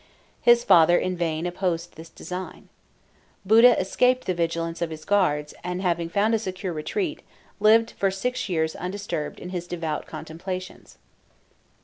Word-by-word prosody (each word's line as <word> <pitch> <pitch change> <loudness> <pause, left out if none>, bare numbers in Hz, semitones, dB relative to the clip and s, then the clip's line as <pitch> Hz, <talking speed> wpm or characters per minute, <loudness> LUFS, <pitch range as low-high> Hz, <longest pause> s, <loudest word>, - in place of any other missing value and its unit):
His 240 0 +5
father 175 -2 +6
in 185 0 -1
vain 165 -1 -2
opposed 175 -1 -2
this 165 +1 -11
design. 180 +1 -8 0.8
Buddha 230 +4 +6
escaped 250 +7 +2
the 185 - 0
vigilance 165 0 -2
of 170 - 0
his 155 -1 -9
guards, 150 -8 +1
and 180 0 -3
having 170 -3 -1
found 205 +6 +1
a 225 - +2
secure 185 -3 -4
retreat, 310 - -3 0.4
lived 225 +2 +5
for 195 - 0
six 215 +5 -3
years 160 -3 0
undisturbed 180 -4 -4
in 180 - -8
his 175 -1 -5
devout 165 -4 -4
contemplations. 170 +4 -7
180 Hz, 145 wpm, -25 LUFS, 165-200 Hz, 0.8 s, father